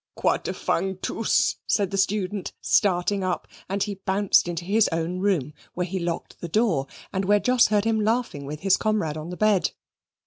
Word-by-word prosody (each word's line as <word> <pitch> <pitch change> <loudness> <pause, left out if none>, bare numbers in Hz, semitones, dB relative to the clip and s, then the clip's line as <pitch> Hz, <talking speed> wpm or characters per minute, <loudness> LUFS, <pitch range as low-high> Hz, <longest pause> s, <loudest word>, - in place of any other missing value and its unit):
"Quater - - 0
fang 190 +2 -1
tooce!" 220 +3 +1
said 200 -3 +1
the - - -2
student, 195 0 -1
starting 195 0 +2
up, 185 -1 -2 0.2
and 195 +1 0
he 200 -2 -5
bounced 195 -1 +3
into 170 0 -4
his 215 +3 +3
own 165 +2 -2
room, 180 -8 0 0.2
where 180 - -1
he 185 +1 -3
locked 170 -1 -4
the 175 - -4
door, 170 - +1 0.3
and 190 0 0
where 205 +2 +4
Jos 250 +2 +4
heard 210 0 +1
him 225 -1 +2
laughing 220 - -1
with 150 +1 -6
his 190 -1 +4
comrade 210 -9 0
on 155 +2 -6
the 180 - -6
bed. 215 -3 +3
190 Hz, 185 wpm, -25 LUFS, 175-210 Hz, 0.3 s, where